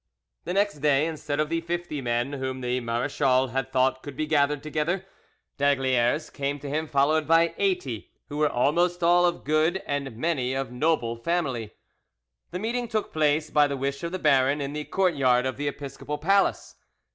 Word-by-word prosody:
The 180 - -2
next 200 -6 +1
day, 145 0 +3
instead 150 -3 -3
of 155 0 +1
the 165 0 -1
fifty 170 -3 -4
men 120 +2 -1
whom 130 -1 -4
the 125 0 -1
marachal 130 +2 +1
had 135 +1 -2
thought 130 0 +2
could 145 -2 -8
be 155 - 0
gathered 145 -2 +1
together, 160 +5 -1 0.5
d'Aygaliers 135 0 +1
came 140 0 -2
to 145 0 -8
him 155 +3 -2
followed 150 +2 +2
by 165 0 +4
eighty, 180 - -1 0.2
who 145 - -6
were 150 0 +3
almost 175 +7 +1
all 175 +1 +5
of 175 0 -3
good 155 +5 +1
and 140 -5 -3
many 130 -3 -1
of 135 -2 -3
noble 125 -3 0
family. 125 -5 -2 0.8
The 180 - -4
meeting 235 +4 -2
took 220 -2 -3
place, 150 0 +1
by 150 -1 +4
the 140 -1 -3
wish 140 +1 -3
of 170 - -4
the 185 - -2
baron, 140 -3 +3
in 140 0 -4
the 150 0 -4
courtyard 135 -10 +2
of 130 - -2
the 145 +1 -2
episcopal 145 +1 -5
palace. 195 +6 +1
145 Hz, 180 wpm, -26 LUFS, 130-165 Hz, 0.8 s, all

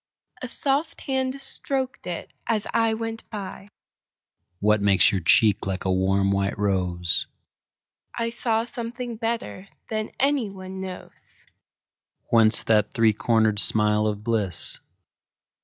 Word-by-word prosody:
A - - -4
soft 285 +3 -1
hand 265 -1 -1
strok'd 265 -1 -4
it 175 -1 -6
as 215 -3 0
I 225 -1 +2
went 225 0 -6
by. 195 -2 -7 0.9
What 105 0 +3
makes 100 -1 +5
your 95 - -1
cheek 105 +4 +4
like 95 0 -3
a 95 - +1
warm 95 +1 +2
white 100 +1 0
rose?I 95 - -3
saw 230 -1 0
something 240 -1 -6
better 225 -4 -3 0.2
than 215 -1 -2
any 275 -5 +2
one 190 -1 -8
knows. 185 -1 -10 0.9
Whence 115 -1 +5
that 105 -2 +2
three 110 -1 +4
corner'd 110 -1 +2
smile 105 0 +3
of 105 -1 -3
bliss? 105 -6 +1
175 Hz, 125 wpm, -24 LUFS, -, 0.9 s, makes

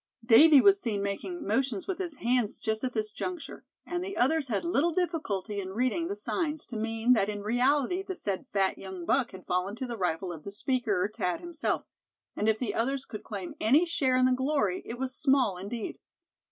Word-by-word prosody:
Davy 275 +5 +8
was 395 -1 +5
seen 205 -4 -1
making 260 - -4
motions 225 0 0
with 380 -2 -3
his 350 -5 -3
hands 240 -4 0
just 220 +1 -2
at 255 -1 -1
this 215 -1 -1
juncture, 355 - -6 0.2
and 350 +1 -3
the 390 +1 -5
others 285 +3 +2
had 215 -5 -1
little 340 -1 +2
difficulty 305 - -2
in 190 0 -6
reading 255 +8 0
the 400 - -3
signs 315 -7 -2
to 240 - -9
mean 225 +2 +2
that 210 -4 +2
in 205 -1 -4
reality 265 - +2
the 385 -1 -5
said 200 - -2
fat 195 -1 +1
young 190 -2 -7
buck 260 +3 +2
had 185 -1 -12
fallen 180 +3 -1
to 260 - -4
the 235 -3 -6
rifle 180 0 -1
of 165 -3 -8
the 200 - -6
speaker, 210 -4 0
Thad, 180 -1 -1
himself; 345 -2 -2 0.5
and 215 - +1
if 220 - +2
the 220 -3 -2
others 270 +3 -1
could 215 - -8
claim 195 -4 -6
any 285 +10 +5
share 270 -7 +1
in 255 - +4
the 255 - +4
glory, 255 -8 0
it 235 - -5
was 260 0 -3
small 265 -8 +2
indeed. 210 +4 -5
245 Hz, 205 wpm, -29 LUFS, 205-300 Hz, 0.5 s, Davy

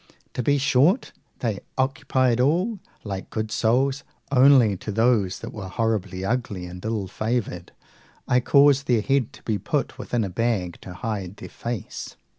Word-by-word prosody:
To - - -2
be 145 +4 +2
short, 140 - +3 0.3
they 110 -5 -1 0.2
occupied 130 -2 +1
all, 180 - +1 0.2
like 95 -3 -5
good 110 0 -3
souls; 130 +6 +1 0.3
only, 130 -5 +6
to 105 - -5
those 110 -4 +2
that - - -7
were 100 -3 -6
horribly 100 -3 -1
ugly 105 -5 -2
and 90 +1 -9
ill 110 -3 -2
favoured, 110 -3 -3 0.6
I 125 - +4
caused 140 +2 +4
their 115 -4 +2
head 135 -2 +1
to - - -15
be 105 -3 -1
put - - -2
within 120 -2 -1
a 100 - -2
bag, 100 -4 -1
to 90 - -9
hide 100 -3 -4
their - - -9
face. 115 -4 -6
115 Hz, 160 wpm, -24 LUFS, 100-130 Hz, 0.6 s, only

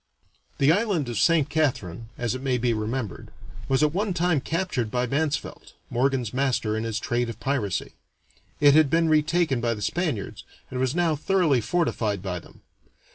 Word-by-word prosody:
The 140 +2 +4
island 185 - +1
of 115 -3 -2
Saint 155 +3 +4
Catharine, 115 - -1
as 120 -2 -1
it 130 - -5
may 130 -2 0
be 120 0 +1
remembered, 110 -1 -4 0.4
was 135 +2 +3
at 150 0 +2
one 195 0 -1
time 170 -4 +2
captured 160 - -2
by 125 +2 0
Mansvelt, 145 +3 -2 0.2
Morgan's 125 -2 0
master 125 -5 0
in 110 +1 -2
his 110 -1 -2
trade 120 +1 -1
of 115 -1 -7
piracy. 115 - -2 0.7
It 145 -1 +6
had 155 -1 +5
been 165 +2 +2
retaken 155 -3 +2
by 115 0 0
the 105 - -8
Spaniards, 155 - -2 0.3
and 125 - -3
was 130 +2 0
now 170 -3 +2
thoroughly 155 -4 +2
fortified 110 - -1
by 90 -2 -3
them. - - -18
135 Hz, 175 wpm, -25 LUFS, 115-160 Hz, 0.7 s, It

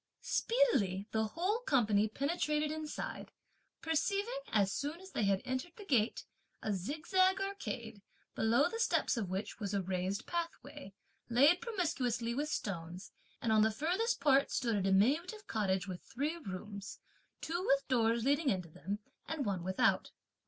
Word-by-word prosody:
Speedily 240 - +2
the 220 0 +1
whole 365 - 0
company 220 - +3
penetrated 300 +4 0
inside, 310 -1 -5 0.5
perceiving, 400 +9 0
as 200 -3 +3
soon 295 +5 -3
as 380 +1 -12
they 215 - 0
had 195 -1 +2
entered 260 +6 -3
the 415 - -10
gate, 240 - +1 0.4
a 215 - 0
zigzag 330 - +1
arcade, 235 - -4 0.3
below 235 +7 +3
the 455 +6 -5
steps 465 - +2
of 215 -6 -2
which 190 +5 -4
was 205 -2 -2
a 200 - +1
raised 185 +2 -2
pathway, 330 - -5 0.4
laid 285 +9 +5
promiscuously 275 - -1
with 290 +4 -1
stones, 180 - -4 0.3
and 230 - +1
on 215 -1 +5
the 220 - +5
furthest 355 - 0
part 275 -1 +4
stood 230 -4 0
a 200 - +1
diminutive 275 - +2
cottage 195 -3 0
with 180 -2 -6
three 290 +7 -2
rooms, 200 - -7 0.4
two 345 +3 -2
with 275 -7 +2
doors 230 -2 +2
leading 285 +1 +3
into 180 -5 -1
them 195 +6 -4 0.3
and 310 -3 -2
one 190 -4 -1
without. 190 +1 +2
250 Hz, 150 wpm, -34 LUFS, 200-330 Hz, 0.5 s, laid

